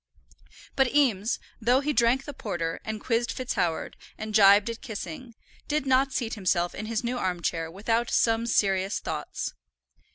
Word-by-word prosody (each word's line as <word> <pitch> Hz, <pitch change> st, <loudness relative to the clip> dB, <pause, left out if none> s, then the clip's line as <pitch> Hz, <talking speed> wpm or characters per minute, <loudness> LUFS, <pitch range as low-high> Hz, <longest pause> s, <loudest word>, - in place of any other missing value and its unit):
But 265 Hz, 0 st, +2 dB
Eames, 230 Hz, -7 st, +2 dB, 0.2 s
though 245 Hz, +4 st, +3 dB
he 300 Hz, +1 st, 0 dB
drank 250 Hz, +2 st, +3 dB
the 290 Hz, -, -6 dB
porter, 175 Hz, -9 st, -3 dB
and 220 Hz, 0 st, -4 dB
quizzed 235 Hz, +2 st, 0 dB
FitzHoward, 175 Hz, -10 st, -2 dB, 0.2 s
and 215 Hz, 0 st, -6 dB
gibed 200 Hz, 0 st, +7 dB
at 230 Hz, -, -9 dB
Kissing, 220 Hz, +2 st, -7 dB, 0.3 s
did 295 Hz, -2 st, 0 dB
not 265 Hz, +1 st, +3 dB
seat 240 Hz, -4 st, -2 dB
himself 180 Hz, -4 st, 0 dB
in 215 Hz, -, -6 dB
his 225 Hz, +1 st, -2 dB
new 245 Hz, +1 st, -2 dB
arm 180 Hz, -4 st, -2 dB
chair 165 Hz, 0 st, -1 dB
without 225 Hz, +6 st, -1 dB
some 225 Hz, 0 st, +2 dB
serious 195 Hz, -3 st, +1 dB
thoughts. -, -, -4 dB
225 Hz, 160 wpm, -27 LUFS, 195-250 Hz, 0.3 s, gibed